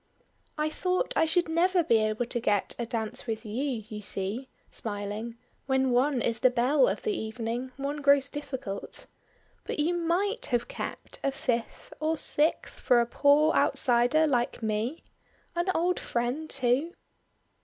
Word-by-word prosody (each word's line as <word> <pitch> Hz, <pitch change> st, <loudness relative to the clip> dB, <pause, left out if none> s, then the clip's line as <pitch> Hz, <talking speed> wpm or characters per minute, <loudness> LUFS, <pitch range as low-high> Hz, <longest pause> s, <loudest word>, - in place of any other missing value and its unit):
"I 305 Hz, 0 st, +1 dB
thought 365 Hz, +7 st, -1 dB
I -, -, +4 dB
should 345 Hz, +2 st, +2 dB
never 345 Hz, +2 st, +3 dB
be 230 Hz, -7 st, +4 dB
able 215 Hz, +2 st, 0 dB
to 240 Hz, -, -1 dB
get 205 Hz, -3 st, +1 dB
a 235 Hz, -, -2 dB
dance 225 Hz, 0 st, -3 dB
with 225 Hz, 0 st, -3 dB
you; 240 Hz, +1 st, -2 dB
you 215 Hz, -2 st, -7 dB
see," 210 Hz, +6 st, -2 dB, 0.2 s
smiling 210 Hz, +2 st, -4 dB, 0.3 s
"when 265 Hz, -1 st, +2 dB
one 255 Hz, +1 st, +2 dB
is 230 Hz, -1 st, 0 dB
the 255 Hz, -, +5 dB
belle 255 Hz, -, +3 dB
of -, -, -2 dB
the 430 Hz, -3 st, 0 dB
evening, 230 Hz, +2 st, -4 dB
one 285 Hz, +2 st, -3 dB
grows 280 Hz, -1 st, +4 dB
difficult. 265 Hz, -9 st, -6 dB, 0.6 s
But -, -, -4 dB
you 310 Hz, +4 st, +1 dB
might 375 Hz, +8 st, 0 dB
have 240 Hz, -3 st, 0 dB
kept -, -, -7 dB
a 275 Hz, -, +2 dB
fifth 240 Hz, -4 st, -3 dB
or 315 Hz, +1 st, 0 dB
sixth 300 Hz, +2 st, 0 dB
for 245 Hz, -, +4 dB
a 235 Hz, -, +3 dB
poor 290 Hz, +5 st, +4 dB
outsider 245 Hz, +6 st, +3 dB
like 245 Hz, -5 st, 0 dB
me. 220 Hz, +8 st, -2 dB, 0.5 s
An 345 Hz, +2 st, 0 dB
old 355 Hz, +2 st, +1 dB
friend 245 Hz, +7 st, -2 dB
too." 260 Hz, +7 st, +1 dB
260 Hz, 155 wpm, -28 LUFS, 230-310 Hz, 0.6 s, the